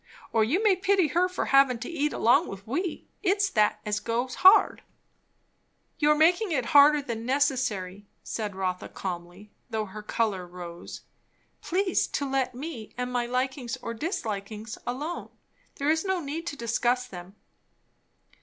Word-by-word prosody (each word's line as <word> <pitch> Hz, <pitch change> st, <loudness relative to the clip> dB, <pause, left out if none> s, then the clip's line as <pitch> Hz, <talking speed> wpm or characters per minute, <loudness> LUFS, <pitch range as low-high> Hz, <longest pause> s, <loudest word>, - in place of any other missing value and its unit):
Or 225 Hz, -, +4 dB
you 320 Hz, -, +1 dB
may 415 Hz, -3 st, +5 dB
pity 375 Hz, -3 st, +2 dB
her 360 Hz, +2 st, +2 dB
for 365 Hz, -, -2 dB
havin' 275 Hz, -2 st, +4 dB
to 230 Hz, -, -7 dB
eat 300 Hz, -3 st, -1 dB
along 235 Hz, -, +3 dB
with 195 Hz, 0 st, -8 dB
we; 325 Hz, -, -3 dB
it's 400 Hz, 0 st, +1 dB
that 215 Hz, -2 st, +2 dB
as 210 Hz, 0 st, -1 dB
goes 240 Hz, +4 st, -2 dB
hard." 375 Hz, +3 st, +6 dB, 1.2 s
"You 300 Hz, -, +3 dB
are 300 Hz, -, +6 dB
making 350 Hz, +6 st, +3 dB
it 260 Hz, -6 st, 0 dB
harder 290 Hz, 0 st, +7 dB
than 230 Hz, -4 st, -5 dB
necessary," 245 Hz, -8 st, -1 dB, 0.2 s
said 210 Hz, -3 st, -4 dB
Rotha 185 Hz, -1 st, -3 dB
calmly, 180 Hz, +2 st, -7 dB, 0.2 s
though 220 Hz, -2 st, -2 dB
her 210 Hz, +2 st, -9 dB
colour 210 Hz, -4 st, -1 dB
rose. 175 Hz, -1 st, -9 dB, 0.6 s
"Please 370 Hz, +1 st, 0 dB
to 285 Hz, -, -2 dB
let 265 Hz, -2 st, -1 dB
me 255 Hz, -5 st, -7 dB
and 250 Hz, 0 st, -3 dB
my 240 Hz, -1 st, 0 dB
likings 255 Hz, 0 st, -2 dB
or 230 Hz, -2 st, -6 dB
dislikings 220 Hz, -, -4 dB
alone. 290 Hz, +8 st, -4 dB, 0.5 s
There 285 Hz, +2 st, +1 dB
is 320 Hz, 0 st, +1 dB
no 380 Hz, -1 st, 0 dB
need 325 Hz, +2 st, -5 dB
to 290 Hz, -, -3 dB
discuss 240 Hz, 0 st, 0 dB
them." 185 Hz, -3 st, -10 dB
250 Hz, 155 wpm, -27 LUFS, 215-310 Hz, 1.2 s, harder